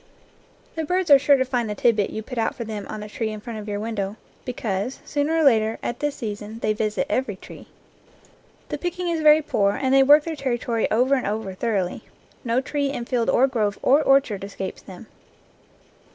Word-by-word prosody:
The 320 - -3
birds 360 +1 0
are 280 - +9
sure 280 +1 +4
to 260 - +1
find 245 -3 -1
the 210 - -3
tidbit 210 -1 +2
you 220 - -5
put 250 +1 -5
out 225 - 0
for 235 - -5
them 215 -2 -6
on 215 - -6
the 210 - -7
tree 220 +1 -3
in 215 0 -6
front 225 0 -7
of 210 - -9
your 205 -1 -3
window, 210 -2 -3 0.3
be 250 - -2
cause, 215 +2 -3
sooner 295 +2 0
or 320 - +3
later, 225 -5 +3
at 240 - -3
this 295 -1 -1
season, 210 -2 -6
they 215 -2 0
visit 215 0 -1
every 255 -6 -1
tree. - - -13 1.0
The - - -4
picking 355 0 -3
is 330 -2 -1
very 305 0 +6
poor 200 -8 +1
and 265 +2 0
they 270 - +6
work 290 +3 +6
their 330 0 -4
territory 240 -4 -1
over 250 +5 +2
and 265 - +1
over 205 -2 -3
thoroughly. 195 -3 -2 0.4
No 245 0 +1
tree 285 +1 -2
in 240 -4 -4
field 240 -2 0
or 260 - +4
grove 215 -7 -1
or 280 +4 +5
orchard 270 -9 +2
escapes 195 -1 -6
them. 195 +4 -12
235 Hz, 210 wpm, -23 LUFS, 210-275 Hz, 1.0 s, are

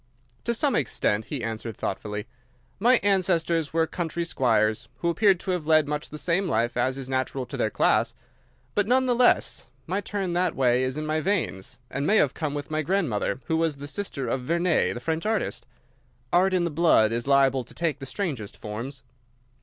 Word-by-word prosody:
"To 235 - +1
some 280 +3 +2
extent," 110 -4 0
he 140 -6 -5
answered, 115 -1 -4
thoughtfully. 105 +2 -4 0.5
"My 240 +4 +5
ancestors 170 -5 +2
were 165 0 +2
country 170 0 -3
squires, 110 -7 +1
who 150 +8 -1
appear 195 +3 +4
to 185 +2 -4
have 175 -4 -2
led 155 -2 +4
much 150 0 -3
the 150 - -7
same 180 +4 0
life 120 -5 0
as 130 +1 0
is 135 -2 -5
natural 130 0 -2
to - - -7
their - - 0
class. - - +2 0.6
But, 205 -1 +1
none 260 +2 +3
the 250 - +2
less, 245 - +2 0.2
my 190 +4 -1
turn 195 -4 -3
that 180 -1 +1
way 125 -1 +3
is 130 +2 -2
in 155 - -3
my 155 +1 0
veins, 130 - -2
and 140 +3 -2
may 215 - +4
have 140 - +3
come 150 -3 -3
with 145 +1 -5
my 155 0 0
grandmother, 150 - -1
who 160 - 0
was 165 -2 +1
the 140 +1 -8
sister 145 -7 -3
of 130 +3 -1
Vernet, 170 +4 +1
the - - -4
French 160 +8 -2
artist. 220 0 -2 0.7
Art 185 +2 +4
in 180 - +2
the 170 - -1
blood 145 -9 +4
is 120 +2 -2
liable 135 -2 +4
to 120 - -13
take 165 -4 -1
the 135 - -7
strangest 135 - -4
forms." 120 +6 -6
155 Hz, 200 wpm, -26 LUFS, 130-180 Hz, 0.7 s, My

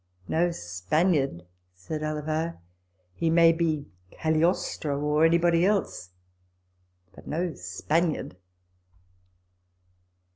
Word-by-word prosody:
" 90 - -31
No 175 +2 +3
Spaniard," 135 - 0 0.3
said 150 - -6
Alava; 155 +2 -2 0.3
" 90 0 -44
he 165 - +1
may 165 0 +6
be 160 -3 -1 0.2
Cagliostro, 155 - 0
or 150 +2 +2
anybody 170 +1 +3
else, 195 - 0 1.0
but - - -15
no 170 +2 -2
Spaniard." 150 - -2
155 Hz, 95 wpm, -27 LUFS, 135-170 Hz, 1.0 s, may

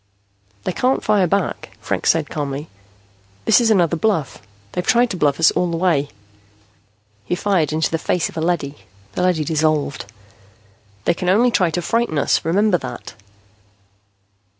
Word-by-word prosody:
"They - - -1
can't 255 +8 0
fire 205 -4 +3
back," 195 0 -2
Franks - - -1
said - - +2
calmly. 145 0 -4 0.8
"This - - +5
is 230 - +2
another 175 -6 +3
bluff. 170 - -1 0.3
They've 180 - -3
tried 240 +4 +3
to - - -3
bluff 145 -3 +1
us 160 - +5
all 180 - 0
the 165 - -2
way." 165 -5 +1 1.1
He - - -2
fired 180 -6 0
into 160 +1 0
the 165 - -1
face 175 +1 0
of - - -12
a 160 - -3
leady. 160 -4 -1 0.4
The - - -3
leady 180 -4 +2
dissolved. 155 -7 -1 0.9
"They 175 - +3
can 180 +1 -2
only 235 +6 +4
try 180 -6 +2
to 175 +2 -3
frighten 230 -7 0
us. 145 - +1
Remember 185 +3 +2
that." 125 -2 -8
170 Hz, 160 wpm, -20 LUFS, 155-195 Hz, 1.1 s, This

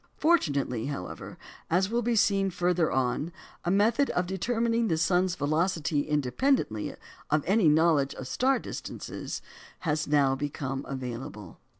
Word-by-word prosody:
Fortunately, 140 - +1
however, 140 -11 -6 0.3
as 190 +4 +2
will 235 +1 +1
be 235 0 0
seen 195 -2 +3
further 175 -2 +1
on, 130 +5 0 0.3
a - - -1
method 220 +9 +3
of 180 - 0
determining 230 +5 0
the 160 - +1
sun's 180 +3 +2
velocity 155 0 0
independently 150 - 0 0.3
of 150 -1 +2
any 195 -3 +4
knowledge 150 -3 +3
of 130 - -7
star 265 - +2
distances, - - -6 0.4
has 150 -2 -1
now 145 -2 +3
become 135 -1 -3
available. 125 -7 -6
160 Hz, 130 wpm, -28 LUFS, 140-195 Hz, 0.4 s, any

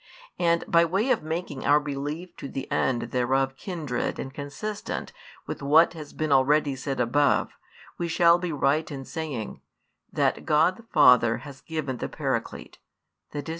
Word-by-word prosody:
And 170 -1 +2
by 170 0 +5
way 195 +10 +1
of - - +2
making 155 -3 -4
our 145 +1 +5
belief 150 +5 -5
to 140 - -7
the 135 - -5
end 125 -2 0
thereof 135 +2 +1
kindred 155 -8 -3
and 135 - -6
consistent 145 - -5 0.3
with - - -6
what 155 +4 +5
has 155 -3 -9
been 155 -1 -3
already 140 +1 +3
said 135 +1 -4
above, 135 +4 +2 0.5
we 170 - -1
shall 170 +1 +4
be 175 -1 -3
right 150 +2 +1
in 135 -3 -7
saying, 145 - -5 0.5
that - - 0
God 160 +4 +3
the 230 - -14
Father 125 -5 +6
has 140 -2 -11
given 150 -6 -4
the - - -4
Paraclete, - - -4 0.6
i.e. 145 - -3
145 Hz, 160 wpm, -26 LUFS, 135-165 Hz, 0.6 s, Father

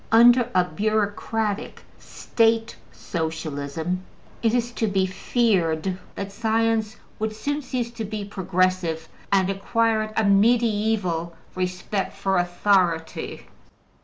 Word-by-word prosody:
Under 240 +1 +6
a 180 - +5
bureaucratic 210 +3 -1 0.2
State 225 0 0 0.2
Socialism 160 +1 -3 0.4
it 230 0 +2
is 240 0 0
to 230 -2 -1
be 195 -2 +2
feared 185 -4 +1 0.2
that 195 0 -5
science 225 0 0 0.2
would 215 0 -2
soon 290 +6 -2
cease 245 -3 -3
to 230 -1 -5
be 210 -1 -4
progressive 185 -4 0 0.2
and 190 -2 +4
acquired 215 +2 0
a 220 - +3
medieval 205 -5 +2 0.2
respect 185 +2 -2
for 195 -2 +1
authority. 175 -2 0
205 Hz, 105 wpm, -24 LUFS, 180-225 Hz, 0.4 s, Under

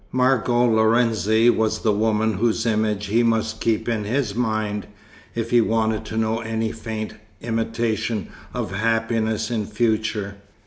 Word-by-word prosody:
Margot 125 -1 +2
Lorenzi 110 0 +3
was 110 -1 0
the 110 - +2
woman 110 +1 +1
whose 115 +3 0
image 105 -2 0
he 110 +4 +2
must 110 -1 0
keep 115 -2 0
in 115 -3 0
his 115 0 -1
mind, 110 -3 -1 0.5
if 115 0 -3
he 120 -1 +6
wanted 110 -1 0
to 110 - -5
know 110 0 +1
any 110 0 -2
faint 110 -1 -5 0.3
imitation 115 -1 -1 0.2
of - - -4
happiness 110 +1 0
in 110 -3 -1
future. 110 -2 -1
110 Hz, 140 wpm, -22 LUFS, 110-115 Hz, 0.5 s, he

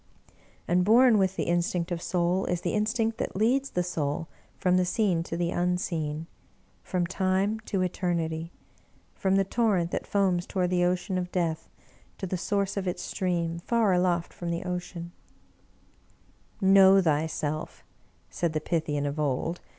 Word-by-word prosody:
And 180 +1 +3
born 230 +2 +6
with 190 -1 +1
the - - -1
instinct 175 +1 0
of 170 -1 -2
soul 180 +1 0
is 175 -1 -1
the - - -2
instinct 220 +1 0
that - - -3
leads 255 +7 +2
the 180 - -1
soul 160 -3 -2 0.3
from 180 -1 +2
the 185 - +3
seen 185 -2 +1
to 165 0 -5
the 170 0 0
unseen,, 170 -4 -1 0.6
from 180 -2 -1
time 190 +4 0
to 195 -3 0
eternity, 170 -2 -2 0.6
from 190 0 0
the 195 - +4
torrent 195 -5 +1
that - - -3
foams 185 -3 +1
toward 180 -2 -1
the 175 -1 +3
Ocean 185 +1 0
of 180 0 -4
Death, 165 -3 -1 0.5
to - - -4
the 185 - -2
source 200 +2 -1
of 190 -1 -2
its 180 - -3
stream, 170 -2 -2
far 220 +1 +2
aloft 180 -1 +1
from 175 - -5
the 170 0 -2
Ocean. 175 -1 -5 0.8
" - - -35 0.2
Know 195 0 +8
thyself," 155 -2 -1 0.4
said 170 -2 -2
the 155 - 0
Pythian 150 -3 -1
of 145 +2 -3
old. 150 +4 -1
180 Hz, 160 wpm, -27 LUFS, 170-190 Hz, 0.8 s, Know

